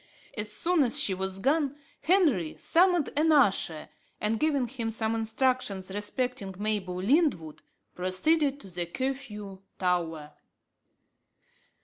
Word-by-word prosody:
As 210 -1 -3
soon 335 +9 +1
as 270 +2 +2
she 210 -9 +3
was 190 0 -3
gone, 280 +5 +1 0.3
Henry 305 - +2
summoned 355 -2 +3
an 315 +2 +3
usher, 195 - +2 0.3
and 215 +1 0
giving 285 -4 +1
him 235 -2 -4
some 225 0 -1
instructions 225 -4 0
respecting 205 -1 -3
Mabel 205 -3 -2
Lyndwood, 185 - +1 0.3
proceeded 275 - +1
to 195 - -12
the 175 0 -3
Curfew 210 -4 -5 0.2
Tower. 165 -5 -1
220 Hz, 115 wpm, -28 LUFS, 190-280 Hz, 0.3 s, she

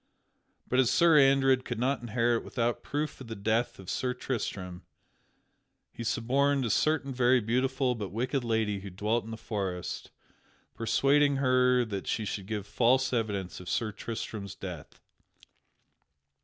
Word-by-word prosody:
But 130 - +1
as 130 -3 +4
Sir 165 -3 +5
Andred 135 -1 +4
could 120 - -4
not 130 +3 0
inherit 120 0 0
without 120 -1 -1
proof 150 -1 -3
of 130 - -9
the 115 - -6
death 110 +4 0
of 95 - -12
Sir 125 +5 -1
Tristram, 95 -8 -4 1.1
he 115 - -6
suborned 130 +4 +1
a 115 - 0
certain 145 0 +1
very 125 0 +4
beautiful 130 +3 0
but 105 -5 -5
wicked 125 +6 -1
lady 110 -3 0
who 100 +1 -8
dwelt 105 +5 -1
in - - -9
the 115 - -6
forest, 95 -5 -4 0.6
persuading 140 +5 +3
her 125 -2 +3
that 100 -4 -5
she 110 - -1
should 100 -1 -4
give 105 -2 -3
false 130 +4 +2
evidence 105 -6 -2
of 90 -1 -8
Sir 110 +2 0
Tristram's 105 -2 -6
death. 90 -6 -8
120 Hz, 150 wpm, -29 LUFS, 105-130 Hz, 1.1 s, Sir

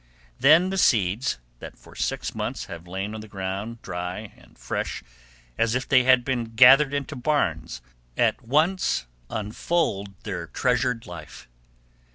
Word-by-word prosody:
Then 165 +6 +6
the 195 - -1
seeds, 110 - +2 0.2
that - - -10
for - - -17
six - - -2
months - - -4
have 85 +1 -9
lain 95 +4 -4
on 110 - -6
the 110 - -11
ground 100 +4 -5
dry 90 +3 -5
and - - -21
fresh - - -4 0.6
as 115 +1 +2
if 130 - -2
they 125 -3 +4
had 130 -2 +5
been 120 -4 -2
gathered 135 +4 +8
into 140 -1 -3
barns, 85 - -1 0.3
at - - +2
once 155 - +1 0.2
unfold 105 - -2
their 95 -6 -5
treasured 125 +4 0
life. 80 -7 -10
115 Hz, 145 wpm, -25 LUFS, 95-130 Hz, 0.6 s, gathered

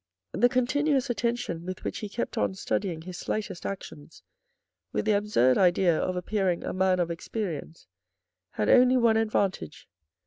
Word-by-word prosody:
The 245 - +3
continuous 265 +2 +1
attention 235 -8 -2
with 185 +1 -6
which - - -4
he 210 - -5
kept 235 +4 -4
on 205 -4 0
studying 180 -4 -2
his 180 0 -8
slightest 210 -5 -4
actions 165 -5 -9 0.7
with - - -2
the 215 - +3
absurd 200 - +2
idea 180 -2 +4
of 185 +3 -1
appearing 185 -1 -1
a - - -3
man 185 0 +2
of 170 -1 0
experience 165 -3 -5 0.7
had 105 - -1
only 255 - +6
one 235 -2 +4
advantage. 200 - -1
195 Hz, 150 wpm, -27 LUFS, 175-230 Hz, 0.7 s, only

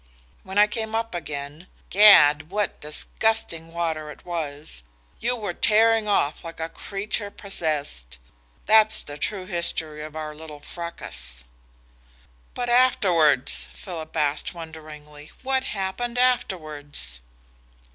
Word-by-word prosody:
When 190 +1 -7
I 210 - +7
came 220 +1 -4
up 225 -1 -2
again 150 0 -6 0.2
gad, 155 -7 +7
what 205 +1 -2
disgusting 165 +1 -1
water 160 -2 -3
it 150 - -12
was! 150 - -4 0.4
you 245 +2 0
were 210 -6 -4
tearing 220 +2 +3
off 155 -7 +1
like 165 -1 -9
a 160 0 -3
creature 205 +2 -3
possessed. 145 - -3 0.5
That's 220 +1 +5
the 145 0 -9
true 190 +3 -2
history 165 -4 -1
of 155 0 -8
our 155 -1 -5
little 150 -1 -11
fracas." 65 - -5 1.1
"But 245 - -2
afterwards?" 180 - +4
Philip 165 -5 -8
asked 150 +3 0
wonderingly. 155 -2 -11
"What 265 0 0
happened 215 +5 -3
afterwards?" 155 - 0
165 Hz, 115 wpm, -24 LUFS, 150-210 Hz, 1.1 s, I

